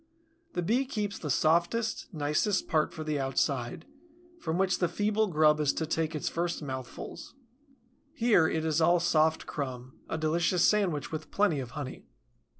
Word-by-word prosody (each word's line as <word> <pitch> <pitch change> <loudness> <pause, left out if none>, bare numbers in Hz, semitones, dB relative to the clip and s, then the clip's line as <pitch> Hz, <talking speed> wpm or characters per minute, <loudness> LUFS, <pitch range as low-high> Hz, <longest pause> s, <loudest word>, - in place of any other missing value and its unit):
The 175 - -1
Bee 240 +9 +2
keeps 210 -6 -3
the 150 - -5
softest, 170 - +1
nicest 155 +5 0
part 155 -1 +1
for 155 - -6
the 155 -2 -1
outside, 135 +1 -1 0.5
from 160 - -2
which 190 0 +1
the 175 - +2
feeble 210 +5 +1
grub 155 -3 +4
is 150 -2 +2
to 160 - -2
take 160 0 -1
its 150 - -3
first 170 -1 -2
mouthfuls. 130 - -7 0.8
Here 230 - +3
it 160 0 -1
is 160 0 +1
all 175 +2 +5
soft 160 -2 +2
crumb, 130 -3 -6
a - - -2
delicious 170 +3 +2
sandwich 190 -9 +1
with 155 0 -5
plenty 200 -8 +2
of 130 +3 -7
honey. 140 -3 -6
160 Hz, 160 wpm, -29 LUFS, 150-185 Hz, 0.8 s, all